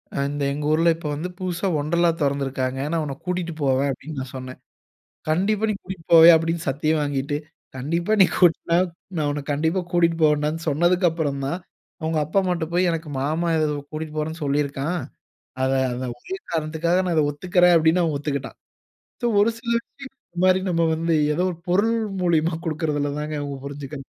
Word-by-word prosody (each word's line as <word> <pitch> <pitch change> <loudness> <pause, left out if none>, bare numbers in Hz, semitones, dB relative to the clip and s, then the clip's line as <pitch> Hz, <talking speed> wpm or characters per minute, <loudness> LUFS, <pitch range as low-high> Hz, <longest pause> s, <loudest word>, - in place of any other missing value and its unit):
அ - - -3
இந்த 145 0 -3
எங்க 145 +1 -4
ஊர்ல, 165 +2 +4
இப்ப 160 - -6
வந்து, 160 +5 -3
புதுசா 185 0 -2
வொண்டர்லா 170 +4 +2
தொறந்திருக்காங்க. 135 -2 -1
அ - - -3
நான் 165 -2 +1
உன்ன 140 -2 -4
கூட்டிட்டு 180 -2 -2
போவேன்" 135 +1 +2
அப்படீன்னு 135 +2 -7
நான் 130 0 -8
சொன்னேன். 130 0 -8 0.7
"கண்டிப்பா, 200 +7 +1
நீ - - -2
கூட்டிட்டு 185 -3 -8
போவயா? 165 +1 +10
"அப்படீன்னு 165 0 -2
சத்தியம் 155 +3 0
வாங்கிட்டு, 145 0 -1 0.4
கண்டிப்பா. 170 +9 -1
நீ - - +9
கூட் 175 -3 +6 0.2
நா - - +5 0.4
நான் 150 -2 +1
உன்ன 145 0 -3
கண்டிப்பா 160 +6 0
கூட்டிட்டு 170 -1 +2
போவேன்டான்னு 150 +1 +2
சொன்னதற்கப்புறந்தான், 165 -2 +1 0.4
அவுங்க 160 0 0
அப்பா, 165 +7 +1
அம்மாட்ட 175 -3 -1
போய், 180 +1 +3
"எனக்கு 165 -2 -4
மாமா 160 +4 0
ஏததோ 150 -1 0
கூட்டிட்டு 155 0 -6
போறேன்னு 160 +2 -4
சொல்லிருக்கான். 145 +4 -1 0.6
அத 130 - +2 0.2
அந்த 125 +1 -4
ஒரே 380 - -6 0.2
காரணத்துக்காக, 160 +2 0
நான் 175 -2 0
இத 155 - +4
ஒத்துக்கறேன்" 180 +3 +3
அப்படீன்னு, 165 +2 +3
அவன் 155 -3 -1
ஒத்துக்கிட்டான். 140 -2 -4 0.7
சோ - - +3
ஒரு 215 - +4
சில 235 0 -3
விஷயங்கள்ல, 270 -1 -13 0.2
இந்த 175 - -6
மாரி, 185 0 +5
நம்ம 165 0 +2
வந்து, 165 +1 0 0.2
ஏதோ 180 - +1
ஒரு 170 - -10
பொருள் 215 +6 +3 0.3
மூலியமா 165 -1 +2
குடுக்கிறதில 150 -2 -1
தாங்க 150 0 -4
அவுங்க 140 -1 -5
புரிஞ்சுக்கணும். 140 -1 -7
160 Hz, 175 wpm, -23 LUFS, 145-175 Hz, 0.7 s, போவயா